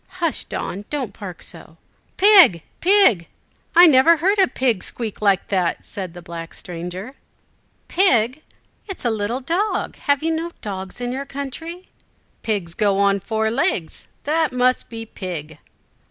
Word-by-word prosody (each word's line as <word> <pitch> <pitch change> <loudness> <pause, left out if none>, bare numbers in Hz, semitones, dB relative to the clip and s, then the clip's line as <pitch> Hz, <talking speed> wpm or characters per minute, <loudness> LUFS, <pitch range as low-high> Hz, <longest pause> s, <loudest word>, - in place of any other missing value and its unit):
Hush, 335 -4 -1
Don! 200 +3 -5
don't 280 -5 -4
bark 190 -4 -8
so!" - - -10 0.4
"Pig, 375 - +7 0.2
pig, 355 - +4 0.5
I 350 +1 +9
never 320 +2 +6
heard 390 +6 +1
a 380 - +5
pig 245 - 0
squeak 225 -4 -5
like 200 -3 +2
that," 185 -4 -1
said 185 -4 -6
the 175 - -10
black 165 -1 -8
stranger. 180 +7 -7 0.7
"Pig! 260 - +3 0.5
It 390 - -5
is - - -10
a 240 - +2
little 220 +4 -2
dog. 350 +10 -1
Have 285 0 0
you 325 0 +1
no 335 +2 -4
dogs 190 +2 -7
in 245 0 -2
your 270 +2 -5
country?" 325 +6 -7 0.5
"Pigs 195 -7 -2
go 200 0 +1
on 200 0 +3
four 220 +2 -1
legs. 230 - -1 0.2
That 315 +1 +1
must 255 0 +1
be 225 -1 -7
pig." 160 -7 -7
235 Hz, 155 wpm, -21 LUFS, 190-320 Hz, 0.7 s, I